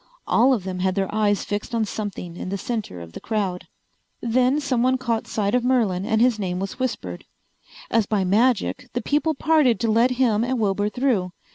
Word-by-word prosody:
All 250 +4 +4
of 230 -8 +1
them 185 -1 -4
had 185 0 0
their 195 -1 -1
eyes 210 -2 +1
fixed 205 +3 -3
on 225 -1 +1
something 200 -5 -5
in 180 - -6
the 200 - -2
center 210 - -4
of 85 -1 -10
the - - -7
crowd. 200 -5 -2 0.5
Then 250 +4 +2
someone 260 -2 +1
caught 235 -3 -2
sight 205 -1 -1
of 250 -1 +2
Merlin 220 -7 +1
and 220 - +2
his 240 -2 +3
name 180 -2 -2
was 195 +6 -5
whispered. 95 - -3 0.7
As 225 -3 +2
by 205 -3 +1
magic 235 +5 +1
the 245 - -1
people 300 +4 +1
parted 290 -8 +3
to 230 - +2
let 230 +3 +4
him 230 -4 +2
and 255 +1 -1
Wilbur 205 -1 +1
through. 210 -8 0
220 Hz, 200 wpm, -23 LUFS, 195-250 Hz, 0.7 s, All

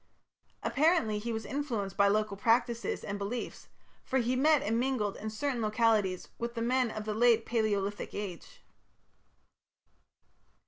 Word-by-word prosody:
Apparently 280 -8 +2
he 235 +3 -4
was 220 -1 -4
influenced 235 -9 -3
by 200 - +4
local 210 0 +1
practices 230 0 +1
and 200 0 -4
beliefs, 210 +5 -5 0.4
for 265 - -1
he 245 0 +1
met 295 +3 +4
and 225 +2 0
mingled 245 -6 0
in 215 - -5
certain 245 +3 -2
localities 215 -4 +1
with 235 +1 -4
the 230 - -3
men 250 0 +2
of 215 -1 -6
the 215 - -2
Late 230 0 +4
Palaeolithic 205 -3 -1
Age. 205 - -7
225 Hz, 140 wpm, -31 LUFS, 210-250 Hz, 0.4 s, by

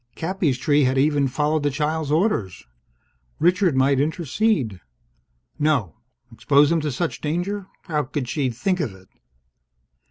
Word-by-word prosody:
Cappy's 165 -6 -1
tree 145 +1 +2
had 130 +1 +1
even 145 0 +2
followed 150 +4 0
the 145 - +1
child's 150 +2 -2
orders. 155 - 0 0.7
Richard 180 -1 +2
might 135 0 +3
intercede 155 - 0 0.8
No! 140 - 0 0.3
Expose 140 +5 +3
him 165 -1 +2
to 150 -1 -2
such 160 +6 -3
danger? 180 +6 -2 0.2
How 150 -5 -1
could 135 -1 -4
she 135 0 -1
think 130 - -1
of 125 - -3
it? 95 0 -19
150 Hz, 135 wpm, -22 LUFS, 130-165 Hz, 0.8 s, might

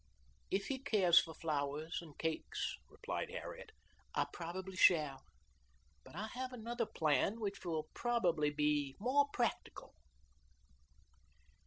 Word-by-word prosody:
"If 195 +1 0
he 270 -1 -2
cares 200 -10 +5
for 160 -2 -4
flowers 150 0 -2
and 155 -4 -13
cakes," 160 -1 -2
replied - - -4
Harriet, 435 - -7 0.4
"I - - +3
probably 185 +3 -5
shall; 150 -7 +5 0.8
but - - -14
I 205 +4 -3
have 255 +1 -3
another 235 -1 -3
plan 160 +7 +1
which 200 -2 -3
will 160 -3 -2
probably 175 -11 +2
be 145 -2 +1
more 270 +6 +3
practical." 240 -2 -2
175 Hz, 120 wpm, -37 LUFS, 155-230 Hz, 0.8 s, cares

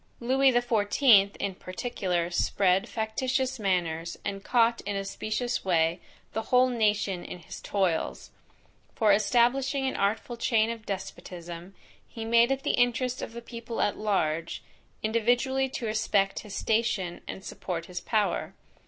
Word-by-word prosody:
Lewis 260 +1 +3
the 240 - +3
XIVth, 210 -2 +4
in 200 - -3
particular, 185 -3 -3
spread 185 +1 +2
factitious 255 +4 -1
manners, 170 -4 -1
and 195 -1 -4
caught 235 -1 +3
in 200 0 -4
a 195 0 -2
specious 215 +5 -2
way, 165 -2 +2 0.3
the 220 - -1
whole 250 +3 +3
nation 210 -6 +1
in - - -7
his 170 - -10
toils; 185 -5 -1 0.6
for 215 -3 +4
establishing 255 +6 +2
an 265 - -1
artful 220 +4 -1
chain 225 -1 +2
of 225 -1 -8
despotism, 180 -2 -7 0.3
he 225 -1 -7
made 235 +1 +5
it 270 0 -1
the - - +2
interest 245 +1 +1
of - - -6
the 235 0 -8
people 235 -1 -7
at 205 - +1
large, 170 -6 -1 0.4
individually 245 +4 +1
to 255 - -5
respect 215 -3 +1
his 205 -2 -8
station, 215 -6 0
and 190 - -7
support 170 -3 -5
his 180 0 -6
power. 215 -3 0
215 Hz, 145 wpm, -28 LUFS, 190-240 Hz, 0.6 s, made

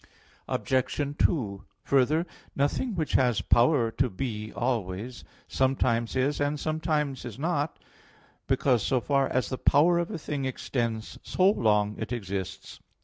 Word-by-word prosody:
Obj. 140 +2 -1
2: 105 - +1 0.2
Further, 140 +5 +2 0.3
nothing 165 - 0
which 160 -4 -2
has 120 -6 +3
power 120 +1 +3
to 130 +2 0
be 110 0 -4
always, 115 -1 -3 0.2
sometimes 130 -3 +1
is 140 +3 +1
and 145 +1 0
sometimes 155 -3 -1
is 120 -3 -7
not; 150 0 -1 0.7
because 125 -5 +2
so 130 - +1
far 140 +2 +1
as 130 - -1
the 130 - -4
power 170 +5 +4
of 175 - -2
a 210 - -4
thing 145 -3 -3
extends 115 -4 -3
so 190 +2 +3
long 105 - +1
it - - -4
exists. 100 -5 -5
130 Hz, 140 wpm, -27 LUFS, 115-145 Hz, 0.7 s, power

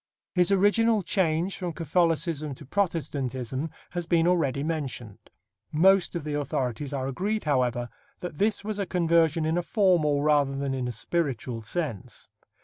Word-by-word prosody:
His 180 0 +3
original 205 +2 +3
change 175 0 0
from 180 -3 -4
Catholicism 165 -3 0
to 145 - -12
Protestantism 140 - -2 0.2
has 175 -1 -3
been 165 -2 +3
already 145 -6 +1
mentioned. 135 -9 -4 0.4
Most 185 +4 +4
of 170 - -3
the 150 0 -4
authorities 135 -2 -2
are 135 -2 -2
agreed, 200 +10 -2
however, 125 -4 +1 0.3
that 175 -4 -6
this 210 0 +1
was 210 0 -3
a 200 - -1
conversion 165 -2 +2
in 160 +2 +1
a - - 0
formal 170 -7 +2
rather 145 -2 +3
than 140 -1 -2
in 130 -2 -2
a - - -2
spiritual 120 -1 -2
sense. 120 - -5
160 Hz, 150 wpm, -27 LUFS, 135-180 Hz, 0.4 s, Most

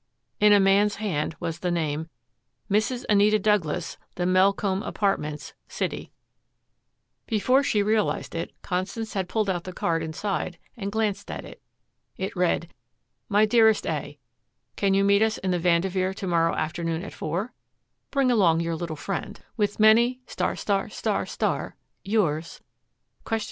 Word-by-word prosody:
In 210 -1 +6
a 205 - +7
man's 200 +2 +4
hand 165 -7 -2
was 165 - -4
the 180 - -1
name, 160 -2 -1 0.6
"Mrs. 220 +5 +1
Anita 210 +1 +4
Douglas, 205 -7 0 0.2
The 175 - -1
Melcombe 190 +1 +2
Apartments, 150 -9 -2
City" - - -4 1.2
Before 245 +5 +3
she 210 -7 +1
realized 215 0 0
it, 165 - -3
Constance 195 +5 -3
had 190 -2 -2
pulled 215 0 0
out 175 -3 -1
the 185 - -6
card 165 -2 -1
inside 175 +2 -3 0.2
and 200 -3 -4
glanced 215 -2 -1
at - - -6
it. - - -12 0.6
It - - -4
read: - - 0 0.6
MY 210 +1 +4
DEAREST 220 -1 +4
A: - - -3 0.6
Can 195 -1 +2
you 195 - +3
meet 200 +1 +4
us 220 0 +2
in 190 - -2
the 180 - +1
Vanderveer 185 +2 +1
to 195 - -5
morrow 165 -2 +2
afternoon 165 +1 -2
at - - -8
four? 190 +10 -3 0.6
Bring 275 -3 +2
along 180 -8 +4
your 165 0 -1
little 160 -1 -4
friend. 195 +5 -5 0.2
With 205 -2 -1
many 235 +4 +5 1.8
Yours 170 -6 0
195 Hz, 140 wpm, -25 LUFS, 170-210 Hz, 1.8 s, a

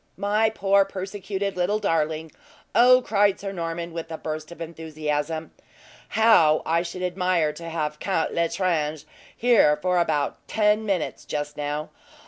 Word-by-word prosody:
"My 210 +3 +2
poor, 200 -2 +3
persecuted 195 0 -4
little 180 +4 +1
darling! 160 -5 -1 0.4
Oh," 255 +1 +6
cried 205 -2 +2
Sir 195 -1 -5
Norman, 170 -2 -4
with 165 0 -6
a 160 - -4
burst 155 0 -5
of 170 - -11
enthusiasm, 155 -1 -4 0.7
"how 175 -9 +5
I 165 +1 +2
should 180 +1 -6
admire 180 -4 +1
to 165 +2 -8
have 150 -2 -3
Count 185 -4 -1
L'Estrange 165 -3 0 0.3
here 225 -11 +4
for 180 +3 +1
about 150 -4 0
ten 215 0 +2
minutes, 190 -5 -2
just 145 0 -4
now! 150 +1 -4
170 Hz, 140 wpm, -24 LUFS, 155-195 Hz, 0.7 s, Oh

